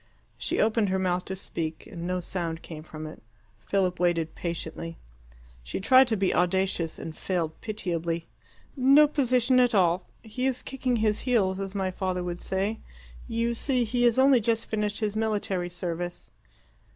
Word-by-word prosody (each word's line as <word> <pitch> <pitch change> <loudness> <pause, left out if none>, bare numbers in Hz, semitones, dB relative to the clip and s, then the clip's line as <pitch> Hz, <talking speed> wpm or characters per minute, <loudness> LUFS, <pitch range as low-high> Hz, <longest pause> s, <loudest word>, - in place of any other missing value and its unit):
She - - -1
opened 220 -2 +2
her 190 - +1
mouth 180 -1 0
to 190 - -4
speak, 165 -4 -4
and 175 -4 -6
no 180 0 -1
sound 170 -2 -4
came 155 -2 -8
from 155 0 -8
it. 155 - -9 0.4
Philip 180 - 0
waited 170 -3 +1
patiently. 165 -1 -5 0.6
She - - -5
tried 260 +6 +6
to 225 -2 +1
be 195 -1 +1
audacious, 180 -2 +1
and 160 - -7
failed 170 -4 -2
pitiably. 170 -6 -2 0.5
"No 275 +3 +6
position 255 -3 +3
at 245 -2 +4
all. 180 -1 +3 0.2
He 240 +4 -2
is 260 -1 -2
kicking 260 -2 -1
his 215 -2 +1
heels, 200 -7 +1
as 195 0 -5
my 190 -1 0
father 185 -1 -2
would 175 0 -4
say. 200 +4 -2 0.5
You 230 +1 0
see, 250 +1 +1
he 240 +2 -1
has 235 0 +4
only 265 -1 +6
just 225 +1 0
finished 210 -1 -2
his 210 -1 -1
military 205 -5 -1
service." 175 0 -4
190 Hz, 165 wpm, -27 LUFS, 175-230 Hz, 0.6 s, tried